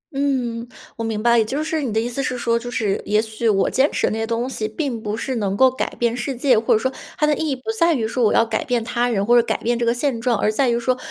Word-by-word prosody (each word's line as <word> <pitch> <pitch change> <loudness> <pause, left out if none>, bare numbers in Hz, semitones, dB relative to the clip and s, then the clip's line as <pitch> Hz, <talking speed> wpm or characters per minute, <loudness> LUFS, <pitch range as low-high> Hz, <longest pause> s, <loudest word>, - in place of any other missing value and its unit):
嗯， 250 -4 -1 0.3
我 230 - -5
明 220 -2 -2
白。 235 0 +5
也 - - +4
就 280 +7 -2
是 315 0 -2
你 260 -5 -2
的 220 - +1
意 230 - -1
思 245 +3 -3
是 255 -2 -2
说， 235 -1 +1
就 245 +1 -7
是 215 -5 -1
也 210 +1 +1
许 220 +1 -1
我 195 -2 +2
坚 270 +3 +2
持 - - 0
的 - - -1
那 220 - -3
些 225 - -2
东 235 +2 -1
西 225 -4 -3
并 235 +1 -3
不 210 0 -3
是 260 +2 -3
能 200 -2 -1
够 260 +2 +5
改 260 - -3
变 235 -1 0
世 265 +2 -3
界， 250 -1 +3
或 225 - -1
者 - - +4
说 260 +4 -1 0.3
它 300 - +2
的 300 0 +2
意 315 +1 -2
义 275 - 0
不 255 - -17 0.2
在 335 -1 +4
于 225 -5 -1
说 245 +2 -1
我 215 - +4
要 230 - +4
改 225 -1 -2
变 245 -3 -1
他 240 +1 0
人 200 -4 0
或 240 +3 +4
者 240 - +7
改 - - -1
变 240 +1 -1
这 - - 0
个 - - +4
现 245 -1 -1
状， 240 -2 +1
而 210 - +1
在 255 +3 +1
于 235 0 +1
说 255 +2 +1
235 Hz, 340 characters per minute, -21 LUFS, 225-260 Hz, 0.3 s, 者